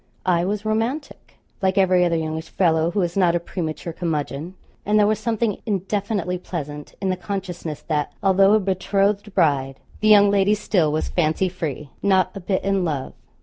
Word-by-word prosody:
I 175 -2 +2
was 205 +2 -2
romantic, 230 +7 -3 0.3
like 190 +1 +1
every 185 -2 +4
other 170 -1 +2
youngish 160 0 -3
fellow 165 -3 +2
who 200 +3 0
is 175 0 -2
not 180 -3 +3
a - - +2
premature 170 -1 -5
curmudgeon; 160 0 -3 0.3
and 210 +1 +2
there 210 - +5
was 215 +1 +1
something 225 -2 -1
indefinitely 200 -2 -1
pleasant 150 -5 -6
in 190 -1 0
the - - 0
consciousness 180 -5 -5
that, 150 -2 -1
although 195 +1 +5
a 215 - +5
betrothed 200 +1 0
bride, 140 -6 +1 0.2
the 215 - +1
young 205 -1 +7
lady 200 +1 +3
still 185 -7 +1
was 155 - -1
fancy 175 +2 +1
free: 150 -5 -5
not 190 -1 +2
a - - -5
bit 190 +1 -1
in 195 -1 +1
love. 145 -6 -3
185 Hz, 180 wpm, -22 LUFS, 165-200 Hz, 0.3 s, young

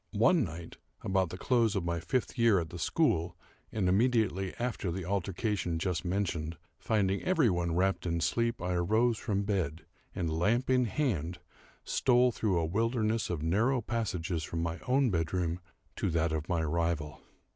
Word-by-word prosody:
One 135 - +4
night, 85 -3 -7 0.3
about 95 -1 +1
the 90 - -6
close 115 -1 +2
of 95 -3 -1
my 85 0 -1
fifth 125 +12 -2
year 115 -6 +4
at 80 -2 -5
the 85 - -7
school, 85 - +1 0.3
and 100 -4 0
immediately 100 -2 +2
after 120 -7 -2
the 90 0 -4
altercation 95 -1 -1
just 85 -1 -1
mentioned, 85 -4 -2 0.2
finding 100 -4 +1
every 160 - +3
one 85 -2 -1
wrapped 95 0 +1
in 85 0 0
sleep, 115 +6 0
I 90 0 -1
arose 110 +7 +2
from 100 -3 -1
bed, 95 -7 -2 0.3
and, 85 -3 -1
lamp 120 +9 +2
in 125 -1 +4
hand, 95 - -1 0.5
stole 125 -1 +3
through 105 -5 0
a 85 - +1
wilderness 110 +4 0
of 80 -3 -3
narrow 115 +11 +2
passages 95 -8 -2
from 80 +1 -3
my 85 +1 -3
own 130 -1 +3
bedroom 85 0 -1 0.4
to - - 0
that 85 -1 +1
of 80 -1 -3
my 85 -3 +1
rival. 80 -1 -1
95 Hz, 170 wpm, -31 LUFS, 85-115 Hz, 0.5 s, One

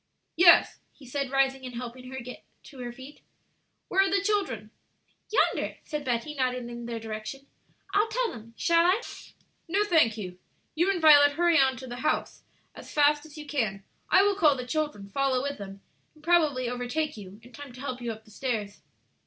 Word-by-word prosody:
"Yes," 345 0 +6
he 280 - -16
said, 275 +2 -3
rising 270 0 +1
and 250 -1 -7
helping 250 +1 -7
her 265 - -7
to 255 - -6
get 250 +1 -10 0.3
on 260 - -9
her 240 -1 -5
feet. 265 +4 -13 0.7
"Where 385 - +3
are 390 - +2
the 395 +1 +2
children?" 355 - -1 0.6
"Yonder," 440 - +1
said 300 -2 -5
Betty, 245 +2 -2
nodding 250 -3 -2
in 235 0 -7
their 230 -1 -4
direction. 220 +5 -7 0.5
"I'll 415 +2 +3
tell 465 +1 -1
them 230 0 -12
shall 335 0 +3
I?" 370 +6 +3 0.7
"No, 390 +5 +2
thank 315 - +3
you; 180 -3 -7 0.3
you 345 +4 +1
and 390 -2 +1
Violet 290 -2 +7
hurry 340 +1 +3
on 265 -1 +3
to 260 - -8
the 245 -1 -7
house 300 - -1 0.3
as - - -12
fast 295 +1 +3
as 305 - -14
you 300 - -8
can; 220 -10 -2 0.3
I 385 - +6
will 405 0 +3
call 315 -8 +4
the 250 -1 -5
children, 295 -7 -3
follow 260 +4 0
with 280 -4 -4
them, 195 0 -9 0.3
and 305 - -21
probably 305 -7 +2
overtake 250 +6 -2
you 200 -1 -11
in 245 - -15
time 285 +2 -10
to 250 - -11
help 255 -3 -5
you 240 -1 -3
up 220 0 -10
the 215 - -18
stairs." 215 -3 -4
270 Hz, 200 wpm, -27 LUFS, 240-310 Hz, 0.7 s, Violet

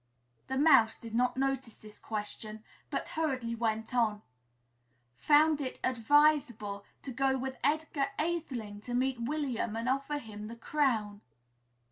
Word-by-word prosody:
The 265 - -2
Mouse 270 -7 +5
did 230 -1 -10
not 250 +2 +1
notice 270 -4 -1
this 215 -1 -12
question, 215 0 -5 0.3
but - - -3
hurriedly 260 -7 -1
went 225 0 -2
on, 215 -4 +1 0.5
"' 120 0 -43
found 300 0 +6
it 260 -2 -4
advisable 255 -5 +2 0.2
to 270 - -5
go 265 +1 +2
with 265 0 -5
Edgar 295 -1 +1
Atheling 260 -11 -3
to 245 +2 -4
meet 255 -1 0
William 245 -4 -2
and 230 +2 -3
offer 275 +3 0
him 215 -5 -8
the 230 - -8
crown.' 230 -6 0
245 Hz, 140 wpm, -31 LUFS, 220-275 Hz, 0.5 s, found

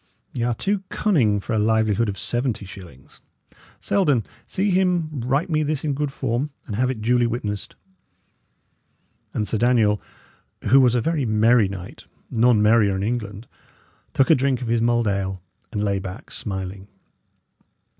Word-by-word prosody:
y' 120 - -3
are 120 -1 0
too 200 - -1
cunning 125 - +2
for 100 - -4
a 110 - +2
livelihood 110 0 +2
of 95 - -4
seventy 120 +1 -2
shillings. 85 -9 -13 0.6
Selden, 145 - +2 0.2
see 195 +2 0
him 180 -4 +1
write 135 +8 0
me 155 -3 +1
this 150 -1 -1
in 150 -2 0
good 145 0 -2
form, 135 +1 -2 0.2
and 105 - -5
have 125 +3 +1
it 115 -5 -4
duly 120 +1 +3
witnessed." 105 -4 -4 1.6
And 105 - -2
Sir 110 +3 -1
Daniel, 115 -4 +3 0.6
who 130 +6 +5
was 125 -2 +4
a 120 - +2
very 155 +1 0
merry 110 0 +4
knight, 95 -2 -9 0.3
none 115 -2 +4
merrier 105 -2 +4
in 95 - -2
England, 105 -1 -3 0.6
took 135 - +3
a - - +9
drink 130 -1 0
of 115 - -4
his 115 -1 +2
mulled 120 -1 +2
ale, 95 -1 -1 0.3
and 105 -3 -2
lay 100 -1 0
back, 95 -1 -8
smiling. 95 0 -5
115 Hz, 160 wpm, -23 LUFS, 105-130 Hz, 1.6 s, a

